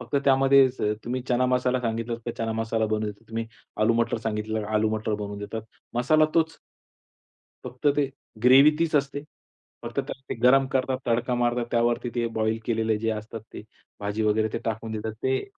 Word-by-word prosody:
फक्त 125 Hz, +3 st, -3 dB
त्यामध्ये 135 Hz, 0 st, +6 dB, 0.4 s
तुम्ही 125 Hz, +2 st, -2 dB
चना 125 Hz, +1 st, +2 dB
मसाला 125 Hz, 0 st, +1 dB
सांगितला 115 Hz, 0 st, -2 dB
तर -, -, 0 dB
चना 115 Hz, 0 st, -1 dB
मसाला 110 Hz, 0 st, 0 dB
बनवून 110 Hz, 0 st, -1 dB
देतात, 105 Hz, +2 st, -17 dB
तुम्ही 115 Hz, 0 st, -3 dB, 0.4 s
आलू-मटर 115 Hz, +1 st, +2 dB
सांगितले 110 Hz, 0 st, -2 dB
आलू-मटर 110 Hz, 0 st, +1 dB
बनवून 105 Hz, -1 st, -5 dB
देतात. 105 Hz, +2 st, -5 dB, 0.3 s
मसाला 155 Hz, +6 st, +4 dB
तोच. 160 Hz, -1 st, +1 dB, 1.1 s
फक्त 125 Hz, +3 st, -6 dB
ते 140 Hz, -2 st, +2 dB, 0.3 s
ग्रेव्ही 135 Hz, +4 st, +8 dB
तीच 165 Hz, -2 st, 0 dB
असते. 140 Hz, 0 st, -1 dB, 0.6 s
फक्त -, -, -7 dB
त्याला -, -, -8 dB
ते -, -, -2 dB
गरम 135 Hz, +2 st, +6 dB
करतात, 130 Hz, -1 st, 0 dB
तडका 120 Hz, +1 st, +1 dB
मारतात, 120 Hz, 0 st, +1 dB
त्यावरती 120 Hz, +1 st, +1 dB
ते 120 Hz, -1 st, 0 dB
बॉइल 110 Hz, +1 st, +1 dB
केलेलं 110 Hz, -2 st, +1 dB
जे 115 Hz, +1 st, -1 dB
असतात, 110 Hz, +1 st, -5 dB
ते -, -, -8 dB, 0.4 s
भाजी 105 Hz, +2 st, -2 dB
वगैरे 110 Hz, +1 st, +2 dB
ते -, -, -1 dB
टाकून 110 Hz, 0 st, -3 dB
देतात. 110 Hz, 0 st, -3 dB
ते 130 Hz, 0 st, 0 dB
115 Hz, 170 wpm, -26 LUFS, 110-130 Hz, 1.1 s, ग्रेव्ही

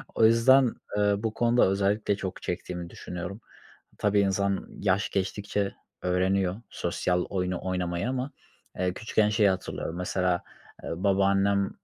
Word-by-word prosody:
O 110 Hz, -, +5 dB
yüzden, 120 Hz, +3 st, +5 dB, 0.2 s
eee, 105 Hz, 0 st, +3 dB
bu 110 Hz, +1 st, -2 dB
konuda 120 Hz, -1 st, +3 dB
özellikle 100 Hz, +1 st, +1 dB
çok 95 Hz, -2 st, -5 dB
çektiğimi 90 Hz, -1 st, -4 dB
düşünüyorum. 90 Hz, +4 st, -7 dB, 0.6 s
Tabii, 105 Hz, 0 st, +3 dB
insan 100 Hz, 0 st, 0 dB
yaş 100 Hz, +1 st, +1 dB
geçtikçe 100 Hz, +1 st, -1 dB, 0.3 s
öğreniyor 90 Hz, +1 st, +1 dB
sosyal 90 Hz, +1 st, -1 dB
oyunu 90 Hz, -2 st, -2 dB
oynamayı 90 Hz, +1 st, -1 dB
ama, 130 Hz, +1 st, -2 dB, 0.5 s
eee, 90 Hz, -1 st, 0 dB
küçükken 110 Hz, 0 st, +1 dB
şeyi 105 Hz, -1 st, +4 dB
hatırlıyorum 95 Hz, -2 st, -3 dB
mesela, 90 Hz, 0 st, 0 dB, 0.4 s
ııı, 85 Hz, +4 st, -4 dB
babaannem 100 Hz, 0 st, +3 dB
100 Hz, 125 wpm, -27 LUFS, 90-105 Hz, 0.6 s, O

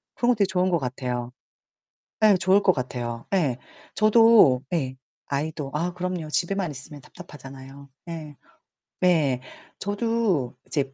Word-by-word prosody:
그런 240 Hz, -, +1 dB
것도 245 Hz, -, +3 dB
되게 200 Hz, -, +4 dB
좋은 185 Hz, -1 st, +1 dB
것 170 Hz, -2 st, +2 dB
같아요. 125 Hz, -2 st, -4 dB, 0.9 s
예 210 Hz, -3 st, +7 dB
좋을 185 Hz, +3 st, +3 dB
것 185 Hz, -, +5 dB
같아요. 120 Hz, -4 st, -5 dB
예. 150 Hz, -10 st, +1 dB, 0.4 s
저도 215 Hz, -, +6 dB
예 130 Hz, -6 st, -1 dB, 0.3 s
아이도 145 Hz, 0 st, -3 dB
아 170 Hz, +3 st, -1 dB
그럼요. 180 Hz, -3 st, -4 dB
집에만 180 Hz, +2 st, -1 dB
있으면 145 Hz, +2 st, -8 dB
답답하잖아요. 140 Hz, -4 st, -12 dB, 0.2 s
예. 155 Hz, -3 st, -7 dB, 0.7 s
네. 155 Hz, -8 st, +3 dB, 0.4 s
저도 205 Hz, -, 0 dB
이제 135 Hz, -3 st, -2 dB
160 Hz, 265 characters per minute, -25 LUFS, 135-185 Hz, 0.9 s, 예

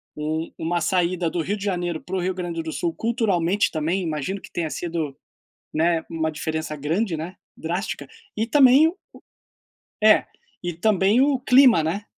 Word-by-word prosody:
um 155 Hz, +2 st, -3 dB
uma 170 Hz, +2 st, -1 dB
saída 175 Hz, 0 st, 0 dB
do 170 Hz, +1 st, -2 dB
Rio 200 Hz, +6 st, -2 dB
de 200 Hz, -, -8 dB
Janeiro 175 Hz, -4 st, -2 dB
para 190 Hz, -, -6 dB
o -, -, 0 dB
Rio 185 Hz, +1 st, -1 dB
Grande 175 Hz, -2 st, -4 dB
do 160 Hz, -, -5 dB
Sul, 165 Hz, +2 st, -2 dB
culturalmente 205 Hz, -5 st, +1 dB
também 165 Hz, +4 st, -1 dB
imagino 165 Hz, +3 st, -3 dB
que -, -, -13 dB
tenha 165 Hz, -2 st, -2 dB
sido, 160 Hz, -4 st, -4 dB, 0.6 s
né, 165 Hz, +1 st, +2 dB
uma 160 Hz, -1 st, -1 dB
diferença 155 Hz, 0 st, -4 dB
grande 165 Hz, +6 st, -1 dB
né, 165 Hz, +4 st, -6 dB, 0.2 s
drástica 175 Hz, +5 st, -4 dB, 0.3 s
e 220 Hz, -, 0 dB
também 270 Hz, +4 st, +6 dB
o 345 Hz, -, -6 dB, 1.1 s
É, -, -, +6 dB, 0.4 s
e 175 Hz, 0 st, -2 dB
também 200 Hz, +4 st, +3 dB
o 275 Hz, 0 st, +3 dB
clima, 250 Hz, -, +6 dB
né. 175 Hz, +7 st, -2 dB
175 Hz, 165 wpm, -23 LUFS, 160-200 Hz, 1.1 s, também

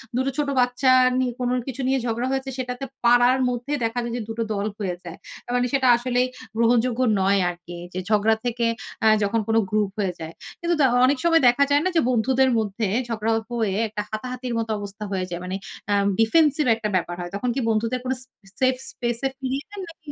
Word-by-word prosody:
দুটো 260 Hz, +2 st, +1 dB
ছোট 295 Hz, -1 st, 0 dB
বাচ্চা 250 Hz, +1 st, +3 dB, 0.3 s
নি 255 Hz, -, +1 dB
কোন 245 Hz, -1 st, 0 dB, 0.2 s
কিছু 265 Hz, +1 st, -4 dB
নিয়ে 265 Hz, 0 st, +2 dB
ঝগড়া 235 Hz, +2 st, -1 dB
হয়েছে 270 Hz, 0 st, -2 dB
সেটাতে 250 Hz, +1 st, -4 dB, 0.2 s
পাড়ার 245 Hz, +2 st, +5 dB
মধ্যে 245 Hz, +3 st, -4 dB
দেখা 230 Hz, +2 st, -1 dB
যায় 235 Hz, 0 st, -4 dB
যে -, -, -3 dB
দুটো 225 Hz, 0 st, -2 dB
দল 200 Hz, 0 st, -2 dB
হয়ে 185 Hz, -3 st, -2 dB
যায়। 175 Hz, 0 st, -8 dB, 0.3 s
আ -, -, -14 dB
মানে 250 Hz, 0 st, +2 dB
সেটা 265 Hz, -2 st, +3 dB
আসলেই 250 Hz, +1 st, 0 dB, 0.3 s
গ্রহণযোগ্য 235 Hz, +1 st, +2 dB, 0.2 s
নয় 195 Hz, +1 st, +3 dB
আরকি। 175 Hz, 0 st, -9 dB, 0.2 s
যে 185 Hz, -, -3 dB
ঝগড়া 215 Hz, +1 st, +3 dB
থেকে 235 Hz, -1 st, 0 dB, 0.4 s
আ -, -, +6 dB, 0.2 s
যখন 225 Hz, +3 st, +1 dB
কোন 225 Hz, -, +1 dB
গ্রুপ 210 Hz, -2 st, +1 dB
হয়ে 190 Hz, -3 st, 0 dB
যায়। 160 Hz, +1 st, -7 dB, 0.3 s
কিন্তু 345 Hz, 0 st, 0 dB
ত -, -, +4 dB, 0.2 s
অনেক 275 Hz, +1 st, +2 dB
সময় 330 Hz, -2 st, +4 dB
দেখা 245 Hz, +4 st, +5 dB
যায় 290 Hz, +1 st, +4 dB
না -, -, +3 dB
যে 325 Hz, -, +5 dB
বন্ধুদের 260 Hz, +2 st, +3 dB
মধ্যে 210 Hz, 0 st, -2 dB, 0.2 s
ঝগড়া 225 Hz, -1 st, -1 dB
অপ 220 Hz, -, -14 dB
হয়ে 195 Hz, -3 st, 0 dB
একটা 210 Hz, 0 st, -4 dB
হাতাহাতির 250 Hz, +2 st, -4 dB
মতো 225 Hz, -1 st, -2 dB
অবস্থা 205 Hz, +1 st, -7 dB
হয়ে 185 Hz, -1 st, -1 dB
যায়। 175 Hz, 0 st, -5 dB
মানে 185 Hz, +1 st, -3 dB, 0.4 s
আ -, -, +4 dB, 0.3 s
ডিফেন্সিভ 295 Hz, +5 st, +4 dB
একটা 215 Hz, -2 st, -3 dB
ব্যাপার 175 Hz, -1 st, -1 dB
হয়। 175 Hz, +1 st, -6 dB
তখন 245 Hz, +4 st, -1 dB
কি -, -, 0 dB
বন্ধুদের 230 Hz, +3 st, 0 dB
কোন 255 Hz, -, -2 dB
সে -, -, -8 dB, 0.3 s
সেফ 260 Hz, 0 st, +3 dB, 0.2 s
স্পেস 240 Hz, -1 st, -2 dB
এ -, -, -3 dB
ফিরিয়ে 265 Hz, +2 st, -3 dB
দেন 405 Hz, -2 st, -7 dB
না 330 Hz, -, -10 dB
কি 300 Hz, -2 st, -9 dB
240 Hz, 215 wpm, -23 LUFS, 215-260 Hz, 0.4 s, আ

